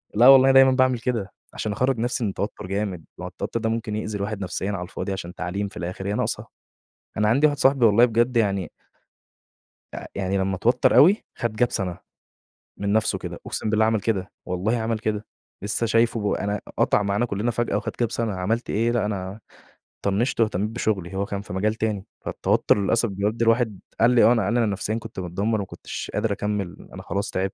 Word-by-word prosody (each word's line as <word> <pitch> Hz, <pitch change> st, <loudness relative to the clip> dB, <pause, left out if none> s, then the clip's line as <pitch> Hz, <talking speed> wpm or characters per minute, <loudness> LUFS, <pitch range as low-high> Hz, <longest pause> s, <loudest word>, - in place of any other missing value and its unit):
لا 120 Hz, +4 st, +6 dB
والله 135 Hz, -1 st, +9 dB
أنا 135 Hz, -, +5 dB
دايمًا 135 Hz, 0 st, +7 dB
باعمل 130 Hz, -1 st, +2 dB
كده، 115 Hz, -5 st, -2 dB, 0.2 s
عشان 110 Hz, -, -3 dB
أخرج 130 Hz, +5 st, +1 dB
نفْسي 120 Hz, +1 st, -1 dB
من 105 Hz, -, +1 dB
التوتر 100 Hz, 0 st, -4 dB
جامد، 95 Hz, -4 st, -3 dB
ما -, -, -7 dB
هو -, -, -3 dB
التوتر 115 Hz, -, -4 dB
ده 110 Hz, -, -1 dB
ممكن 110 Hz, -1 st, -2 dB
يأذي 105 Hz, -1 st, -3 dB
الواحد 100 Hz, +1 st, -4 dB
نفسيًا 95 Hz, +1 st, -3 dB
على 90 Hz, -3 st, -3 dB
الفاضي 95 Hz, +2 st, -5 dB
عشان 90 Hz, -2 st, -6 dB
تعليم 95 Hz, +3 st, -3 dB
في -, -, -12 dB
الآخر 90 Hz, +3 st, -5 dB
هي 100 Hz, -, -1 dB
ناقصة، -, -, -2 dB, 0.7 s
أنا 105 Hz, 0 st, +2 dB
عندي 140 Hz, +7 st, +4 dB
واحد 145 Hz, -1 st, 0 dB
صاحبي 135 Hz, -3 st, +4 dB
والله 110 Hz, +3 st, +6 dB
بجد 120 Hz, +1 st, +1 dB
يعني 100 Hz, -6 st, +1 dB, 1.2 s
آآ -, -, -7 dB
يعني 95 Hz, 0 st, -1 dB
لما 95 Hz, 0 st, 0 dB
اتوتر 120 Hz, +7 st, +2 dB
أوي 190 Hz, +8 st, +6 dB
خد 115 Hz, -2 st, -3 dB
Gap 120 Hz, -, +2 dB
سنة، 90 Hz, -4 st, -2 dB, 0.8 s
من 100 Hz, 0 st, -1 dB
نفسُه 110 Hz, 0 st, +1 dB
كده، -, -, -6 dB
أقُسم 110 Hz, -, -2 dB
بالله 110 Hz, 0 st, +3 dB
عمل 110 Hz, -1 st, +2 dB
كده، 95 Hz, -3 st, -1 dB, 0.2 s
والله 95 Hz, +6 st, 0 dB
عمل 115 Hz, -1 st, -1 dB
كده، 105 Hz, -1 st, -3 dB, 0.4 s
لسه 105 Hz, +3 st, -1 dB
شايفُه 115 Hz, -2 st, +1 dB
أنا 105 Hz, 0 st, -2 dB, 0.2 s
قطع 105 Hz, -, +3 dB
معانا 100 Hz, +4 st, 0 dB
كُّلنا 105 Hz, +3 st, -1 dB
فجأة، 120 Hz, +1 st, -1 dB
وخد -, -, -3 dB
Gap 120 Hz, -, +2 dB
سَنة، 115 Hz, -4 st, -2 dB
عملت 110 Hz, +6 st, -2 dB
إيه، 115 Hz, +3 st, +1 dB
لأ، 120 Hz, -3 st, +1 dB
أنا 100 Hz, 0 st, -4 dB, 0.7 s
طنشت 100 Hz, +7 st, 0 dB
وأهتميت 105 Hz, -2 st, +1 dB
بشُغلي، 100 Hz, -5 st, -2 dB
هو 100 Hz, -, 0 dB
كان 100 Hz, 0 st, -4 dB
في 100 Hz, -, -9 dB
مجال 105 Hz, +3 st, 0 dB
تاني، 105 Hz, -3 st, -2 dB, 0.2 s
فالتوتر -, -, +2 dB
للأسف 110 Hz, +3 st, +1 dB
بيودّي 105 Hz, +4 st, -1 dB
الواحد 115 Hz, -3 st, +2 dB, 0.2 s
قال 115 Hz, +2 st, +5 dB
لي: 125 Hz, -, +5 dB
"آه، -, -, +7 dB
أنا 110 Hz, -6 st, +2 dB
أنا 115 Hz, +1 st, +2 dB
نفسيًا 105 Hz, +2 st, -2 dB
كنت 115 Hz, -, -7 dB
متدمر 100 Hz, +5 st, -1 dB
ما 100 Hz, -, -3 dB
كنتش -, -, -7 dB
قادر 105 Hz, +1 st, 0 dB
أكمل 100 Hz, -3 st, -3 dB
أنا -, -, -7 dB
خلاص 100 Hz, +1 st, -2 dB
تعبت،" 95 Hz, +1 st, -2 dB
105 Hz, 205 wpm, -24 LUFS, 100-115 Hz, 1.2 s, والله